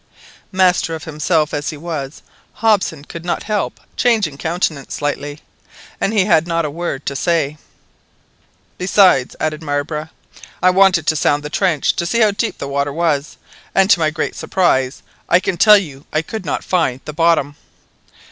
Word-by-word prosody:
Master 180 -3 +2
of 160 - -8
himself 155 0 0
as 145 0 -2
he 155 - -6
was, 150 -3 -6 0.3
Hobson 200 -9 +1
could 165 +2 -9
not 175 - -2
help 210 -2 -2 0.2
changing 210 - +1
countenance 160 -4 -2
slightly, 145 0 -4 0.6
and 195 - 0
he 205 -4 +2
had 165 -5 +3
not 170 -1 0
a 150 - -3
word 165 -3 -4
to 140 - -3
say. 150 -1 0 1.2
"Besides," 180 -8 +3
added 155 0 -2
Marbre, 150 +1 -3 0.5
"I 185 - +4
wanted 185 -3 +4
to 155 - +2
sound 145 0 +1
the 150 - -6
trench, 180 -7 +1
to 170 - -1
see 230 +6 +1
how 215 -2 +5
deep 215 +3 -2
the - - -5
water 140 +1 -1
was, 155 -2 -1 0.4
and 195 +1 +4
to 180 - +5
my 155 -1 +2
great 155 - -3
surprise, 135 -8 0 0.3
I 180 - +5
can 185 - -2
tell 210 +2 +8
you, 145 -8 -6
I 155 - 0
could 185 0 -7
not - - -2
find 135 -8 0
the 150 - -6
bottom." 160 -3 +2
160 Hz, 170 wpm, -18 LUFS, 145-185 Hz, 1.2 s, tell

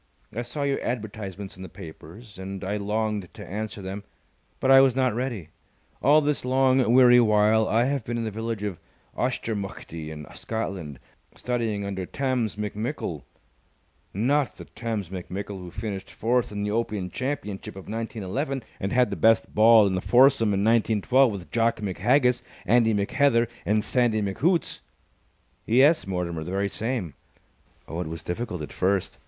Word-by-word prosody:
I 120 - -1
saw 140 +5 -4
your 140 -1 0
advertisements 105 -5 -5
in - - -11
the 95 - -8
papers, 90 +6 -12
and 95 +1 -6
I 100 +2 -2
longed 105 -2 -2
to - - -9
answer 105 +1 -5
them, 95 +2 -5 0.6
but 135 - +2
I 135 0 +9
was 135 -2 +4
not 130 -3 +2
ready. 115 - -3 0.5
All 150 +2 +5
this 150 -1 0
long, 130 -1 +3
weary 125 -1 +7
while 110 -1 +4
I 115 +2 +3
have 135 -1 -1
been 120 +1 -3
in 115 - -2
the 110 - -3
village 110 0 -4
of 100 -5 -4 0.4
Auchtermuchtie, 100 -10 -3
in 75 -1 -8
Scotland, 95 - -4 0.4
studying 115 -5 -2
under 95 -2 -4
Tamms 130 -6 -1
McMickle." 105 +2 -4 0.9
"Not 135 +7 +1
the - - -10
Tamms 110 -5 -4
McMickle 95 +2 -6
who 90 -1 -8
finished 100 -1 -5
fourth 120 +1 0
in 100 0 -3
the 105 - -1
Open 105 -5 -2
Championship 130 -10 -4
of 95 - -10
1911, 115 +5 -3 0.2
and 95 - -2
had 125 -1 +3
the - - -1
best 115 0 +3
ball 110 0 +7
in 95 - +1
the 90 - -1
foursome 130 0 +5
in 100 -1 +1
1912 115 +3 +3
with 90 -7 -8
Jock 115 0 +2
McHaggis, 120 +6 +2 0.2
Andy 115 -1 +4
McHeather, 115 +4 +2 0.2
and 105 +1 +2
Sandy 115 -4 +1
McHoots!" 155 - 0 0.9
"Yes, 140 +4 +4
Mortimer, 85 -4 -3
the 85 - -7
very 100 +2 0
same. 110 - -3 0.7
Oh, 80 - -5
it 90 - -4
was 80 0 -7
difficult 90 -2 -4
at 75 - -8
first. 95 0 0
110 Hz, 160 wpm, -25 LUFS, 95-125 Hz, 0.9 s, I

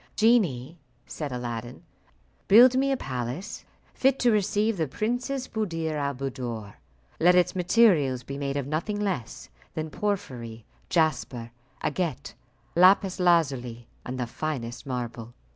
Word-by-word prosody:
"Genie," 175 - +2 0.3
said 150 -3 -5
Aladdin, 120 -1 -5 0.6
"build 240 +5 +8
me 275 +1 +2
a 270 - +1
palace 130 - -5 0.3
fit 270 0 +2
to 245 -2 +3
receive 210 +1 +1
the 160 -2 0
Princess 245 - -2
Buddir 165 -8 -2
al 140 -2 -1
Buddoor. 120 -6 -5 0.5
Let 180 +2 +5
its 180 0 +3
materials 175 - +3
be 140 - -6
made 140 0 -2
of 140 - -2
nothing 165 +9 -2
less 190 - -3 0.3
than 155 0 -4
porphyry, 120 - -4 0.2
jasper, 135 -8 0 0.3
agate, 155 -2 -2 0.4
lapis 185 +2 +5
lazuli, 135 -10 +1 0.2
and 130 +1 -5
the 125 - 0
finest 120 -2 -5
marble. 120 -2 -5
155 Hz, 125 wpm, -26 LUFS, 125-200 Hz, 0.6 s, build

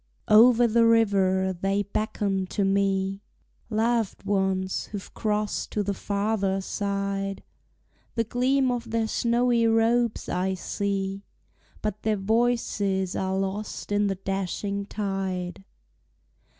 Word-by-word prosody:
Over 235 +2 +7
the 230 +1 +4
river 190 -4 +3
they 195 +3 0
beckon 200 -2 -1
to 200 +1 -1
me, 195 0 +1 0.5
Loved 225 -1 0
ones 190 -2 0
who've 205 -2 -8
crossed 210 -1 -1
to 210 - 0
the 200 0 -1
farther 200 -1 -1
side, 195 0 -3 0.7
The 230 - +2
gleam 255 +3 +1
of 240 -1 -3
their 225 0 0
snowy 235 0 +2
robes 225 +1 +2
I 190 +1 -1
see, 195 +1 -2 0.6
But 210 -1 -2
their 215 -1 +1
voices 200 -3 0
are 190 0 -1
lost 195 +2 -4
in 205 0 +2
the 195 - -1
dashing 195 +1 -3
tide. 190 - -3
200 Hz, 115 wpm, -26 LUFS, 195-225 Hz, 0.7 s, Over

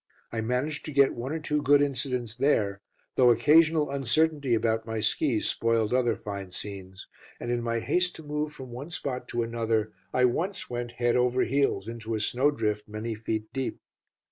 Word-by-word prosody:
I 115 - -2
managed 125 +7 -1
to 155 - -5
get 140 -1 +4
one 125 +3 -5
or 160 - -2
two 150 -1 -1
good 145 +1 +5
incidents 125 -4 -1
there, 105 -7 +1 0.4
though 125 -2 +6
occasional 150 +5 +4
uncertainty 140 0 +1
about 110 0 0
my 110 0 -2
skis 110 +2 +1
spoiled 115 -1 +1
other 120 -3 +2
fine 100 -3 -6
scenes, 95 0 -6 0.3
and 120 - -3
in 120 0 0
my 115 -1 -1
haste 180 +6 +1
to 160 - -9
move 150 0 -2
from 130 -4 -10
one 130 +6 -7
spot 135 -6 -4
to 120 0 -1
another, 115 -2 -1 0.2
I 125 - +3
once 170 +10 -1
went 120 0 -4
head 120 -1 +1
over 125 +1 +3
heels 135 -7 +1
into 115 -1 -4
a - - -1
snowdrift 110 -3 0
many 110 +2 -4
feet 110 0 -4
deep. 135 -1 -3
120 Hz, 180 wpm, -27 LUFS, 110-140 Hz, 0.4 s, though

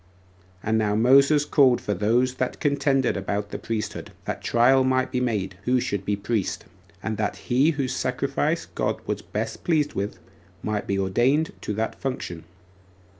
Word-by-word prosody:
4. 110 - -4
And 110 - +3
now 105 -1 +1
Moses 140 +6 +5
called 135 -4 +4
for 105 - -2
those 115 +6 +2
that 130 - -2
contended 140 -2 +1
about 100 +1 -3
the - - -4
priesthood, 110 -2 -4
that - - -4
trial 130 +3 +4
might 130 0 +1
be 125 - 0
made 100 -6 -1
who 125 +1 +3
should 100 -4 -2
be 105 - +1
priest, 100 0 -2 0.4
and 110 -1 -2
that 105 -1 -1
he 130 +5 +2
whose 135 -5 -1
sacrifice 140 +6 -1
God - - -2
was - - -2
best 110 +2 -4
pleased 155 -4 +1
with 100 +1 -3 0.5
might 105 -1 -2
be 100 - 0
ordained 120 +11 +2
to 105 - -3
that 110 +1 -1
function. 105 -11 -5
120 Hz, 170 wpm, -25 LUFS, 105-135 Hz, 0.5 s, Moses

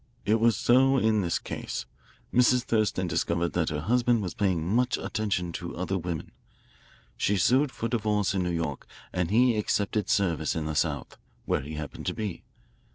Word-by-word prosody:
It 110 +2 +3
was 115 -1 +3
so 135 +2 +4
in 110 -3 +2
this 85 -3 0
case. - - -5 0.5
Mrs. 125 0 +4
Thurston 110 -5 +1
discovered 85 0 0
that 85 -3 +1
her 75 -1 -3
husband 120 +3 +2
was 90 - -4
paying 95 -7 0
much 120 +7 +1
attention 100 -6 -2
to 85 +1 -6
other 95 +2 -2
women. 85 -3 -4 0.9
She 105 - +1
sued 130 - +3
for 115 - -3
divorce 105 -4 0
in 95 - 0
New 90 - -1
York, 80 -5 -3 0.3
and 90 -2 0
he 120 +3 +4
accepted 105 -1 0
service 85 -6 +1
in 80 -1 -2
the 80 - -2
South, 75 -3 -1 0.3
where - - 0
he 75 +3 -7
happened 75 -2 -6
to - - -1
be. 105 -5 -4
100 Hz, 175 wpm, -27 LUFS, 85-115 Hz, 0.9 s, so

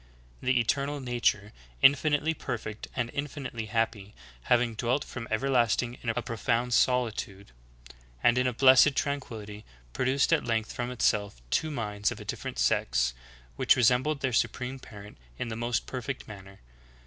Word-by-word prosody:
"'The 130 -1 +2
eternal 140 +5 0
na 125 -2 -4
ture, 105 -1 +1 0.3
infinitely 145 +3 +4
perfect 110 -7 -5
and 120 -2 -2
infinitely 135 -6 -5
happy, 110 -3 -2 0.3
having 120 -1 +3
dwelt 125 +5 0
from 120 -2 -7
everlasting 120 0 +1
in 120 - -3
a 115 +1 -1
profound 120 +1 -1
solitude, 110 - 0 0.7
and 120 +1 +4
in 125 - +2
a - - +1
blessed 130 +3 +6
tranquility, 110 -8 -4 0.3
produced 130 +2 +2
at - - +2
length 115 -2 -1
from 120 0 -3
itself, 105 - 0
two 155 - +1
minds 105 -7 -2
of - - -7
a - - -9
different - - -5
sex, - - +1 0.4
which - - +4
resembled 125 +5 +2
their 130 -2 -1
supreme 125 +3 -1
parent 105 - -12 0.2
in 120 - -3
the 110 - -4
most 120 0 -1
perfect 130 0 -5
manner. 95 -2 -12
120 Hz, 150 wpm, -28 LUFS, 110-130 Hz, 0.7 s, blessed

